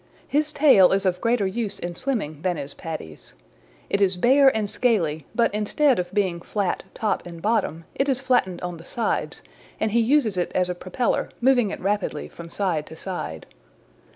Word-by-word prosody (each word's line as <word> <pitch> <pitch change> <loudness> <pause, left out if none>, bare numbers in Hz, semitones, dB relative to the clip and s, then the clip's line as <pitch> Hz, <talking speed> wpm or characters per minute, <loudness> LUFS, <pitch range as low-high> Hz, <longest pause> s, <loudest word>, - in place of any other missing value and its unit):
His 300 +1 +1
tail 270 -13 +6
is 195 0 +1
of 180 -1 0
greater 230 -3 +2
use 205 +2 -2
in 175 0 -5
swimming 175 - -1
than 180 -1 -1
is 140 -1 -4
Paddy's. 155 - -8 0.5
It 200 - 0
is 190 -2 +3
bare 270 +8 +5
and 215 -2 -1
scaly, 200 - 0
but 235 -3 +2
instead 245 +5 +2
of 175 0 -3
being 190 -4 0
flat 200 0 -2
top 215 -2 -1
and 170 -1 -9
bottom 175 -5 -1
it 275 +1 0
is 260 -2 +2
flattened 245 -9 +1
on 175 -1 -4
the 165 - -12
sides, 230 +6 -2 0.4
and 220 - 0
he 235 - +3
uses 230 -4 +2
it 175 - -1
as 180 -1 +2
a - - -1
propeller, 185 +7 -1
moving 245 -3 +3
it - - -5
rapidly 195 -5 -2
from 170 0 -11
side 170 -5 -1
to 160 - -10
side. 160 - -6
195 Hz, 185 wpm, -24 LUFS, 175-235 Hz, 0.5 s, tail